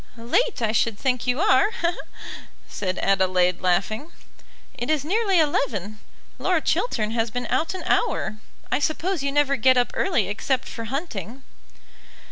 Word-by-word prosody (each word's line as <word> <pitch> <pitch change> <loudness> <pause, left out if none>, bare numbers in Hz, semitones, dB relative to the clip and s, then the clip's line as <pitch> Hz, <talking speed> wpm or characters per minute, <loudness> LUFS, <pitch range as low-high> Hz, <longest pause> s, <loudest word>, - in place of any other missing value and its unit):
"Late; 245 - 0
I 215 - +2
should 225 -1 +1
think 250 -1 -1
you 250 +3 +1
are," 410 0 +4 1.0
said 185 -2 -3
Adelaide 185 -2 +2
laughing. 200 - 0 0.6
"It 240 - -5
is 305 -2 +1
nearly 395 +1 +2
eleven. 215 - 0 0.4
Lord 360 -4 +1
Chiltern 290 - 0
has 225 0 0
been 245 +2 -4
out 330 +4 0
an - - -6
hour. 215 - 0 0.3
I - - +2
suppose 320 +3 -1
you 280 0 -1
never 280 -1 +2
get 255 +3 +4
up 245 - +2
early 250 - +1
except 225 +6 -1
for 230 - -6
hunting." 255 - -5
250 Hz, 145 wpm, -24 LUFS, 215-310 Hz, 1.0 s, are